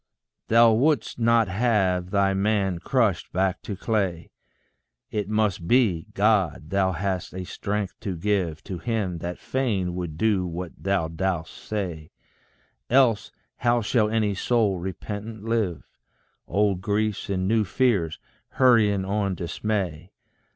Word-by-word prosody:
Thou 115 0 +6
wouldst 125 0 +1
not 115 -1 +4
have 95 -4 +1
thy 100 0 +2
man 95 -2 +1
crushed 105 -1 0
back 95 0 0
to 100 - -5
clay; 95 -5 -1 0.8
It 105 -2 -2
must 105 -6 0
be, 105 -9 +3
God, 95 -6 +1
thou 95 -1 +2
hast 95 0 -3
a 95 - -4
strength 100 +1 -3
to 95 -5 -4
give 90 -4 -1
To 95 -4 -6
him 100 -5 -2
that 90 +2 -5
fain 105 -9 -1
would 85 -4 -5
do 95 -1 +1
what 85 0 -5
thou 95 -4 0
dost 80 0 -2
say; 90 -8 -5 0.8
Else 125 -4 +3 0.3
how 120 0 +2
shall 105 0 +2
any 110 -2 +1
soul 105 -2 +1
repentant 105 +4 -6
live, 110 -9 -1 0.6
Old 100 -3 +1
griefs 105 +1 -1
and 95 -1 0
new 110 +1 +3
fears 100 -6 +1 0.4
hurrying 110 -7 +4
on 100 -1 -1
dismay? 90 -2 -3
100 Hz, 130 wpm, -25 LUFS, 90-110 Hz, 0.8 s, Thou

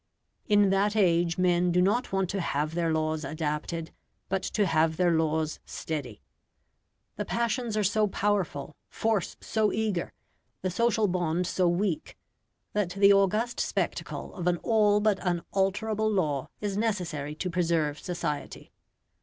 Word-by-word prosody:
In 205 -2 +4
that 200 +2 +2
age 170 -4 +3
men 180 -1 +3
do 180 - +2
not 205 +7 +2
want 190 -1 +1
to 195 - -2
have 150 -1 -1
their 165 -1 0
laws 155 0 0
adapted, 155 +2 -3 0.4
but 190 +1 0
to 210 - 0
have 160 -2 +2
their 180 -1 +3
laws 160 -1 0
steady. 130 - -5 0.9
The - - -2
passions 235 -1 -1
are 210 - +2
so 210 +2 +2
powerful, 190 -8 -1
force 220 -4 -1
so 215 -2 +1
eager, 210 -5 -1 0.5
the 185 - 0
social 225 +1 +2
bond 175 -1 0
so 180 0 +1
weak, 200 - -1 0.6
that 205 -4 0
the 200 +2 +5
august 210 +5 +2
spectacle - - -2
of 180 -3 -4
an 175 -1 +3
all 210 -2 +3
but 210 -2 +2
unalterable 195 +4 0
law 150 -10 0
is 205 -2 -2
necessary 175 -9 -2
to 180 +3 -3
preserve 165 -4 0
society. 170 -5 -4
180 Hz, 145 wpm, -28 LUFS, 160-210 Hz, 0.9 s, the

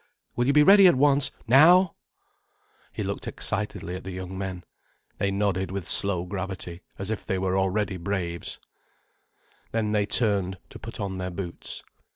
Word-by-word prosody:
Will 120 +1 +1
you 140 - +3
be 150 0 +6
ready 195 +2 +8
at 175 - +5
once, 140 +1 +3 0.2
now?" 165 +9 +6 1.0
He - - -4
looked - - -4
excitedly 90 - -3
at 95 - -6
the 95 - -7
young 95 0 -6
men. 95 -2 -5 0.6
They 100 - +1
nodded 100 -2 0
with 95 -2 -5
slow 95 -3 +2
gravity, 95 -2 -5 0.2
as 95 +2 -4
if 110 - -3
they 95 - -2
were 95 0 0
already 95 0 0
braves. 85 -2 -4 1.1
And 110 -2 -1
they 105 -1 +1
turned 100 -5 +1
to - - -10
put - - -9
on 95 -2 -3
their 90 0 -3
boots. 90 -1 -6
95 Hz, 165 wpm, -26 LUFS, 95-110 Hz, 1.1 s, ready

